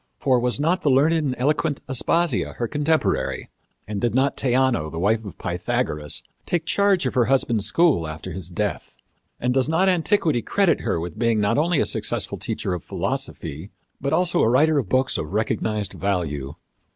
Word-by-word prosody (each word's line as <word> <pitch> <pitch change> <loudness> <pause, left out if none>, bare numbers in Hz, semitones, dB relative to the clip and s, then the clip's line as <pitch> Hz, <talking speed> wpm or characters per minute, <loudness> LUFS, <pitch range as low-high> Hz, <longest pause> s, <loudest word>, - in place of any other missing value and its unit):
For 130 -3 +2
was 125 +2 0
not 170 +5 +1
the 145 - +2
learned 140 +5 +4
and 150 -6 0
eloquent 145 +2 0
Aspasia 135 - +1
her 120 - -3
contemporary? 155 +3 0 0.4
And 100 -1 -4
did 120 -1 0
not 135 +1 +2
Theano, 130 - +1
the 80 - -7
wife 110 +6 +1
of 100 -5 -9
Pythagoras, 75 -1 -2 0.2
take 170 -2 -1
charge 195 -3 +2
of 130 - -1
her 125 -2 +3
husband's 120 -5 +1
school 140 - +3
after 80 +4 -7
his 90 -1 -7
death; 100 +3 -3 0.4
and 125 +1 0
does 130 +2 +1
not 180 +4 +3
antiquity 165 - +1
credit 195 - +2
her - - -1
with 85 +5 -6
being 115 -2 +2
not 105 +6 +2
only 165 0 +2
a - - +2
successful - - -1
teacher 95 - -3
of 90 - -5
philosophy, 80 +8 -4 0.3
but 140 +1 -1
also 180 -1 +2
a - - +4
writer 150 +5 +4
of 110 -9 -4
books 130 +1 +1
of 75 +3 -5
recognized 110 -1 -1
value? 80 -8 -2
125 Hz, 180 wpm, -23 LUFS, 100-155 Hz, 0.4 s, learned